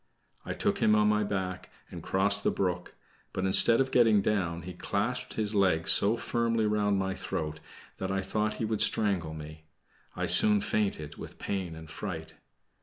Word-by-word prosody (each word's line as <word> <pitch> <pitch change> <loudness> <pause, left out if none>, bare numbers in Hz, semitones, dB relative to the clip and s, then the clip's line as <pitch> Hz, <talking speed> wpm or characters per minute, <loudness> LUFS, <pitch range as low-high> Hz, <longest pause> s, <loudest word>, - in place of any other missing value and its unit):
I - - -5
took - - -1
him 105 - +3
on 105 0 +3
my 105 0 +2
back, 95 -2 -4 0.2
and - - -8
crossed 100 +2 +1
the - - +2
brook, 90 -2 -3 0.4
but 95 - -2
instead 115 +4 +7
of 135 0 0
getting 115 -4 +4
down, 85 -6 -1
he 90 +2 -8
clasped 105 +8 -3
his 110 -1 -1
legs 90 -5 +2
so 105 +4 +3
firmly 115 -2 -1
round 105 -1 +1
my 95 0 -1
throat 75 -3 -5 0.4
that 95 - -3
I 95 0 -1
thought 105 +2 -2
he 115 - -3
would 110 -1 -1
strangle 90 -7 +1
me. 80 0 -10 0.5
I - - -2
soon 105 -1 +5
fainted 100 -8 -2
with - - -10
pain 95 -5 -4
and 80 0 -11
fright. 80 0 -7
100 Hz, 180 wpm, -29 LUFS, 90-105 Hz, 0.5 s, instead